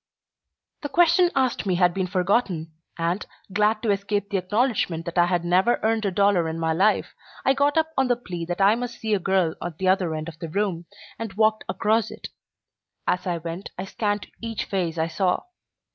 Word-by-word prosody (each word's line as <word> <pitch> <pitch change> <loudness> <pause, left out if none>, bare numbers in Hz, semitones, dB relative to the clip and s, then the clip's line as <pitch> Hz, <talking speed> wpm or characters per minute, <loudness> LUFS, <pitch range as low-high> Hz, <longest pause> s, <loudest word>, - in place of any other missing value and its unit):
The 290 - -4
question 350 +3 +4
asked 255 -5 +1
me 185 - +2
had 175 -1 +3
been 190 0 -1
forgotten, 180 -3 0 0.3
and, 170 +4 -1 0.3
glad 215 +2 +2
to 220 - +2
escape 200 +1 -1
the 200 - +1
acknowledgment 190 -4 0
that 170 +1 -1
I 175 - +5
had 175 -1 0
never 185 +7 +3
earned 220 0 +1
a 200 - +1
dollar 190 -3 +3
in 160 - -4
my 160 -1 0
life, 195 +6 +2 0.3
I 270 - +5
got 285 +2 +2
up 320 0 +2
on 265 -1 +2
the 245 - +3
plea 180 -8 -6
that 175 +3 -3
I 200 +2 +6
must 245 +1 -4
see 220 -1 -1
a 205 - +3
girl 185 -3 +1
at 170 -2 -5
the 190 -1 +1
other 185 -4 +2
end 155 +1 -4
of 165 -1 -9
the 165 - -5
room, 175 -2 -2 0.3
and 225 -3 -5
walked 215 +1 +2
across 220 0 +1
it. - - -8 0.8
As 180 - 0
I 175 -1 0
went 170 +3 -6
I 185 - -4
scanned 205 +1 -2 0.2
each 230 -2 -3
face 175 -4 -2
I 160 - +1
saw. 180 +3 0
195 Hz, 205 wpm, -24 LUFS, 175-220 Hz, 0.8 s, I